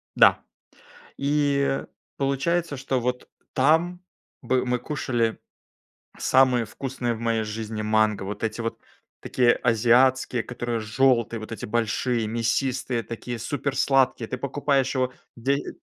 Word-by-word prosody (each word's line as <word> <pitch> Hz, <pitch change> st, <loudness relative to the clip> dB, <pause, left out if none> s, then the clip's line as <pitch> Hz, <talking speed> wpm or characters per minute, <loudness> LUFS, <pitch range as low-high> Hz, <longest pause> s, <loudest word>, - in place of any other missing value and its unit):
Да. -, -, +6 dB, 0.8 s
И 140 Hz, -1 st, +1 dB, 0.3 s
получается, 145 Hz, +4 st, 0 dB
что 130 Hz, -1 st, -1 dB
вот 125 Hz, +1 st, -3 dB, 0.2 s
там 165 Hz, +6 st, +2 dB, 0.4 s
бы 130 Hz, -1 st, +1 dB
мы 125 Hz, -1 st, 0 dB
кушали 120 Hz, -4 st, -1 dB, 0.8 s
самые 130 Hz, -3 st, +3 dB
вкусные 125 Hz, -1 st, -3 dB
в 110 Hz, -, -7 dB
моей 115 Hz, -1 st, 0 dB
жизни 110 Hz, 0 st, -5 dB
манго, 110 Hz, -1 st, +2 dB
вот 100 Hz, +3 st, -6 dB
эти 110 Hz, +1 st, -2 dB
вот 115 Hz, 0 st, -4 dB, 0.4 s
такие 120 Hz, -2 st, +3 dB
азиатские, 120 Hz, +1 st, +3 dB
которые 120 Hz, -1 st, -3 dB
жёлтые, 115 Hz, +1 st, +2 dB
вот 110 Hz, -, -9 dB
эти 115 Hz, -, -5 dB
большие, 115 Hz, +1 st, 0 dB
мясистые, 120 Hz, +2 st, -1 dB
такие 115 Hz, +2 st, -6 dB
супер 140 Hz, +1 st, -3 dB
сладкие. 130 Hz, -4 st, +2 dB
Ты 130 Hz, -, -4 dB
покупаешь 140 Hz, 0 st, 0 dB
его 130 Hz, -2 st, 0 dB, 0.2 s
дей 135 Hz, +4 st, -1 dB
125 Hz, 125 wpm, -25 LUFS, 115-135 Hz, 0.8 s, Да